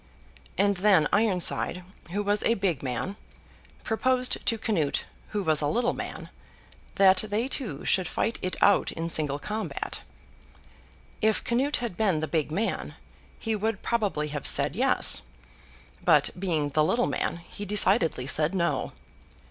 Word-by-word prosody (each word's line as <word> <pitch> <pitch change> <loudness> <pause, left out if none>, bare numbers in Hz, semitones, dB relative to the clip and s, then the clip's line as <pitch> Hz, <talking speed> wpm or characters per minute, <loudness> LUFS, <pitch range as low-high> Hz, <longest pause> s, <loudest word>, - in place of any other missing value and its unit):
—and 200 -1 +2
then 185 -5 +4
Ironside, 185 -3 +2 0.3
who 205 +4 -2
was 205 +1 0
a 230 - +2
big 190 - -1
man, 130 - -3 0.7
proposed 255 +3 +1
to 230 - +2
Canute, 175 -10 -1 0.2
who 205 -1 -3
was 155 -3 +2
a 145 - +1
little 240 +7 +1
man, - - -7 0.6
that 190 -1 +5
they 215 +4 -1
two 235 - -4
should 185 -2 +1
fight 230 - -2
it 185 - -2
out 205 - +4
in 165 +1 -4
single 145 -3 0
combat. 215 +8 -5 1.2
If 220 -1 +1
Canute 265 +5 0
had 230 -8 -4
been 195 -8 +1
the 155 - -3
big 155 -2 -1
man, 210 +8 -2 0.4
he 225 -1 -2
would 215 0 -2
probably 200 -10 -1
have 145 -1 +2
said - - +4
yes, - - +3 0.8
but, - - +4
being 160 -6 -1
the 155 +2 +2
little 240 +10 +1
man, - - -2
he 170 +4 -10
decidedly 195 - +2
said 150 +6 +2
no. 170 -2 -1
195 Hz, 150 wpm, -27 LUFS, 160-220 Hz, 1.2 s, that